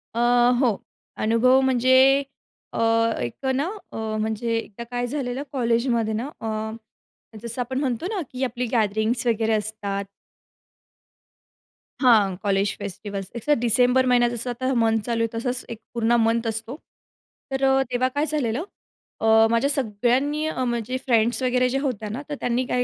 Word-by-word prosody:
अ, - - -1 0.4
हो. 235 -6 +2 0.5
अनुभव 240 +4 +4
म्हणजे 260 +2 +4 0.5
अ, - - -3 0.4
एक 120 - -5
अ, 265 - +2
ना, 270 +2 0 0.3
अ, - - -6 0.2
म्हणजे 220 +1 -1
एकदा 225 0 -6
काय 245 0 -1
झालेलं 265 0 -3
कॉलेजमध्ये 235 -3 +1
ना, 235 +6 -2
अं, 220 0 -3 0.7
जसं 235 +2 -3
आपण 260 +2 -2
म्हणतो 260 +1 -2
ना, 405 -5 -2
की 255 +1 -4
आपली 250 0 -2
गॅदरिंग्स 220 +2 +1
वगैरे 225 -1 +1
असतात. 210 -2 -2 2.0
हां, 215 -7 +5
college 200 0 +1
festivals. 195 0 -6
It's 235 +5 -7
a - - +7
December 250 +2 +3
महिना 245 -1 +4
जसं 240 +1 -4
आता 255 +2 -1
मंथ 225 0 +2
चालू 230 -1 -1
आहे, - - +1
तसंच 250 +1 -3
एक 230 -2 -7
पूर्ण 235 0 +2
मंथ 230 +1 +1
असतो. 225 +3 -4 0.8
तर 270 0 -2
अ, 270 0 +4
तेव्हा 250 +1 +1
काय 290 - +1
झालेलं. 290 -2 -1 0.6
अ, - - 0 0.3
माझ्या 235 +4 +2
सगळ्यांनी 270 +4 0
अ, 260 -5 -2
माझ्या 240 +1 -2
फ्रेंड्स 235 0 +2
वगैरे 250 0 +2
ज्या 270 +2 -1
होत्या 225 -7 -3
ना, 245 +7 -4
तर 290 - -3
त्यांनी 245 +1 0
काय 250 0 0
240 Hz, 160 wpm, -24 LUFS, 220-260 Hz, 2.0 s, अ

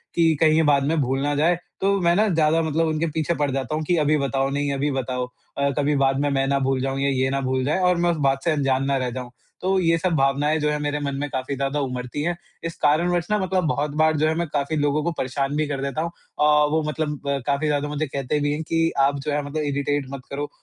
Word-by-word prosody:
कि 165 -2 +4
कहीं 155 -1 +5
ये 160 - +4
बाद 145 -2 +3
में 165 - +1
भूल 135 0 0
ना 145 +1 0
जाए 165 +4 +3 0.3
तो 200 0 +2
मैं 170 0 +3
ना 215 +3 +3
ज़्यादा 160 -1 +3
मतलब 160 +1 +1
उनके 155 +1 0
पीछे 160 +1 0
पड़ 145 -2 0
जाता 135 +2 -2
हूँ 155 - -2
कि 175 - +3
अभी 150 +1 +3
बताओ 135 -1 0
नहीं 145 0 -1
अभी 140 +2 0
बताओ। 125 -1 -2 0.3
अ, 140 0 +2
कभी 145 0 +2
बाद 135 -1 +2
में 145 0 +1
मैं 135 -1 +1
ना 140 0 +1
भूल 135 -1 0
जाऊँ 135 0 -2
या 140 - +1
ये 130 -1 +1
ना 135 0 -1
भूल 130 0 0
जाए 155 +6 +1
और 180 - +2
मैं 175 0 +2
उस 165 - -2
बात 135 0 -2
से 170 - +2
अनजान 135 -3 +1
ना 140 - +1
रह 130 -1 -1
जाऊँ। 125 -1 -6 0.3
तो 190 +1 +1
ये 165 -1 +3
सब 175 +1 0
भावनाएँ 140 +2 +2
जो 150 0 +1
है 150 - 0
मेरे 145 0 -1
मन 140 -1 -3
में 145 +1 -3
काफ़ी 130 +1 -3
ज़्यादा 140 +2 -1
उमड़ती 125 +1 -3
हैं। 175 +1 0 0.3
इस 165 - -4
कारणवश 170 +3 +2
मतलब 190 -3 +1
बहुत 150 0 -1
बार 155 -1 +3
जो 155 - +2
है 160 - +2
मैं 170 +1 -1
काफ़ी 145 +1 0
लोगों 145 +1 +1
को 170 - 0
परेशान 135 +2 -2
भी 155 -1 0
कर 140 -2 -3
देता 140 +3 -2
हूँ। 170 +1 -3 0.3
आह, 150 0 +5
वो 155 +2 +1
मतलब 150 -1 -2 0.3
काफ़ी 140 +2 +1
ज़्यादा 145 0 0
मुझे 150 +1 -2
कहते 140 +2 -2
भी 145 0 0
हैं 150 - -3
कि 165 0 +1
आप 140 +1 +3
जो 150 +2 -3
है 145 - 0
मतलब 150 +2 -3
इरिटेट 145 0 -1
मत 135 - -6
करो। 145 +1 -4
145 Hz, 270 wpm, -23 LUFS, 135-160 Hz, 0.3 s, कहीं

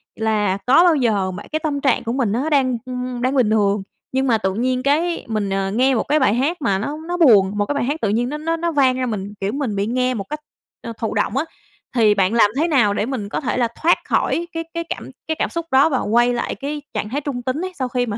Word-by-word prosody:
là 210 -3 0
có 275 +7 +6
bao 345 -3 +5
giờ 210 -8 +1
bạn 195 +3 -8
cái 310 - 0
tâm 295 -3 -2
trạng 260 -2 +2
của 230 0 -2
mình 250 -6 0
nó 255 +8 -1
đang, 260 -5 +2
ưm, 250 -1 -4
đang 255 +3 0
bình 250 -5 +3
thường, 205 -2 +2 0.3
nhưng 265 +1 0
mà 230 -3 +3
tự 190 -3 -1
nhiên 255 +4 -1
cái 325 +5 +1
mình, 215 -3 -2
ờ, 195 0 -1
nghe 255 +5 +2
một 225 - +1
cái 300 +2 +1
bài 260 -7 +3
hát 290 +8 0
mà 195 -7 +1
nó 285 +9 -3
nó 350 0 -2
buồn, 205 - +5
một 205 - +1
cái 290 - -2
bài 285 - 0
hát 290 +6 -2
tự 215 - +1
nhiên 235 +4 0
nó 300 - -4
nó 325 +2 -1
nó 340 +1 -1
vang 265 -4 +3
ra 255 - -1
mình, 205 -4 -4
kiểu, 195 +1 -1
mình 265 -6 -2
bị 200 0 0
nghe 255 +2 0
một 210 -5 -3
cách, 300 - -4 0.4
ơ, 230 - -5
thụ 225 - -3
động 210 +3 0
á, 290 - +1 0.5
thì 220 -3 +5
bạn 195 +1 +2
làm 225 -3 +5
thế 320 +4 +2
nào 250 -11 +3
để 205 - -1
mình 230 -6 -4
có - - -3
thể 260 - -2
là 240 -2 +2
thoát 340 +2 +4
khỏi 340 +1 0
cái 330 0 -3
cái 335 0 -2
cảm - - -5 0.2
cái 320 - -1
cảm - - 0
xúc 335 -1 -4
đó 270 +4 +5
và 265 -4 0
quay 240 +3 +2
lại 240 - -2
cái 290 +2 -5
trạng 210 - -3
thái 280 +5 -2
trung 280 -4 -4
tính 260 +6 -2
ấy 370 - -5
sau 260 - 0
khi 245 0 -1
mà 215 -3 -4
250 Hz, 280 wpm, -20 LUFS, 215-285 Hz, 0.5 s, có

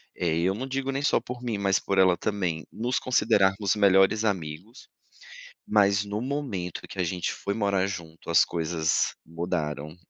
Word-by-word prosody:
eh, 85 -2 0
eu 95 +3 +1
não 130 +4 -4
digo 135 0 -2
nem 135 +1 -2
só - - +3
por 125 0 -8
mim 115 -4 -2
mas 100 -1 +2
por 100 - -2
ela 95 -2 +5
também, 90 -7 -2
nos 125 +3 -1
considerarmos 100 -5 +2
melhores 100 +1 +4
amigos, 95 - -4 0.8
mas 100 -1 +3
no 100 +1 -4
momento 125 - -4
que 95 - -10
a 90 - +2
gente 90 +1 -2
foi 100 0 -4
morar 100 -3 +1
junto 85 -4 -7
as 85 - +6
coisas 80 -1 0
mudaram. 80 -2 -3
95 Hz, 165 wpm, -26 LUFS, 85-110 Hz, 0.8 s, as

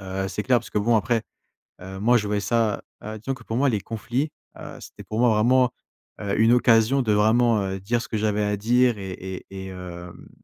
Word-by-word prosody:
heu, 95 0 -4
c'est 105 - -4
clair 125 +2 +3
parce 115 - -12
que - - 0
bon 115 +3 +2
après, 115 +2 +1 0.6
heu, 95 +1 -8
moi, 120 +4 +4
je 105 -3 0
voyais 105 0 0
ça 110 +1 0 0.2
heu, 110 0 -6
disons 130 +6 -3
que 130 - -14
pour 110 - -4
moi, 140 +3 +3
les 105 -4 -1
conflits, 120 +8 -3 0.3
heu, - - -9
c'était - - -11
pour 110 - -5
moi 120 -1 +5
vraiment, 125 +4 +3 0.5
heu, 100 0 -2
une 115 +1 +5
occasion 120 +2 +4
de 110 -3 +1
vraiment, 110 +2 +3
heu, 95 0 -4
dire 115 +5 -1
ce - - -7
que - - -3
j'avais 105 0 0
à 105 0 0
dire 120 +2 +2
et 95 -1 -6
et 95 +1 -7
et 95 0 -7
hem, 90 -2 -9
110 Hz, 230 wpm, -24 LUFS, 100-120 Hz, 0.6 s, moi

